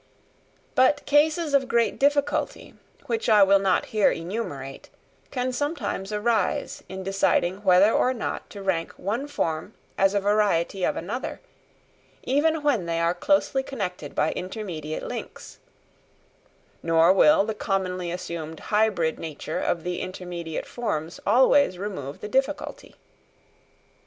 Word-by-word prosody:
But 260 +3 +3
cases 305 +1 +2
of 270 -2 +3
great 235 -2 +1
difficulty, 285 0 0 0.3
which 455 -1 -1
I 210 -2 +7
will 195 0 +5
not 195 -1 +1
here 215 -2 +4
enumerate, 165 -7 -5 0.6
sometimes 255 - -3
arise 210 -1 0
in 190 0 -6
deciding 190 -1 +1
whether 190 +2 +6
or 255 - +2
not 245 -3 -4
to 200 -1 -9
rank 170 -4 -1
one 230 +9 -3
form 165 - -3 0.2
as 195 +1 +3
a - - +4
variety 200 -3 +1
of - - +1
another, 215 +10 -4 0.8
even 305 +3 +1
when 240 -12 +1
they 165 0 -1
are 170 +1 +2
closely 270 +7 +1
connected 185 - -5
by 150 - +2
intermediate 180 -6 -5
links; - - -7 1.2
nor 165 +2 +4
will 300 +4 +5
the 220 +1 -2
commonly 185 -3 -2
assumed 170 -3 -5
hybrid 205 -7 +2
nature 155 -3 -5
of 170 - -1
the 180 0 -3
intermediate 175 -3 -5
forms 170 -9 -4
always 260 -4 +4
remove 160 -8 -6
the - - -5
difficulty. 270 +6 -2
195 Hz, 125 wpm, -25 LUFS, 175-250 Hz, 1.2 s, I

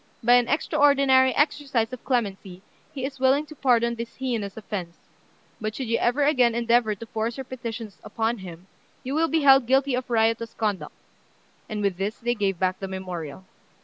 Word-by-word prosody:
By 240 +2 +5
an 245 -1 +5
extraordinary 275 -2 +3
exercise 280 -5 0
of 255 - -8
clemency, 195 -7 -2 0.3
he 265 -3 -4
is 270 -1 -7
willing 265 +3 +3
to 310 - -12
pardon 235 -4 +2
this 230 0 -7
heinous 230 -7 -3
offence; 190 -6 -6 0.6
but 215 0 -3
should 265 - -4
you 230 - +1
ever 255 +5 +1
again 255 -5 +3
endeavour 235 -2 +2
to 230 - -9
force 225 +2 -3
your 265 - -4
petitions; 230 -5 -7
upon 225 +1 -2
him, 175 -1 -10 0.4
you 260 - -4
will 320 +2 +2
be 320 -1 +1
held 270 -3 +6
guilty 270 +1 +2
of 250 0 -2
riotous 230 0 +1
conduct;" 210 -4 -3 0.7
and 210 -1 -3
with 195 -3 0
this 200 +4 -3
they 240 +1 -1
gave 200 -5 -1
back 185 +1 -1
the 195 - -4
memorial. 185 -3 -6
235 Hz, 180 wpm, -25 LUFS, 210-265 Hz, 0.7 s, held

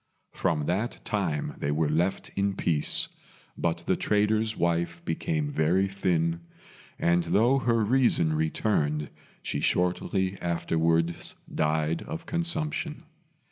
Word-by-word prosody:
From 80 -5 0
that 100 +9 -1
time 85 -9 -1
they 70 - -1
were 75 +1 +1
left 85 +6 0
in 100 0 -1
peace; 80 -6 +1 0.5
but 85 0 -1
the 95 - +2
trader's 110 +1 +1
wife 85 0 0
became 150 - -1
very 95 - +2
thin, 85 -4 0 0.6
and 85 0 +2
though 120 +10 +3
her 115 -3 +2
reason 115 -9 +3
returned, 75 -1 0 0.3
she - - -2
shortly 95 +1 0
afterwards 85 -1 0 0.2
died 80 +1 +1
of 165 0 -6
consumption. 160 -2 -1
90 Hz, 115 wpm, -27 LUFS, 80-110 Hz, 0.6 s, though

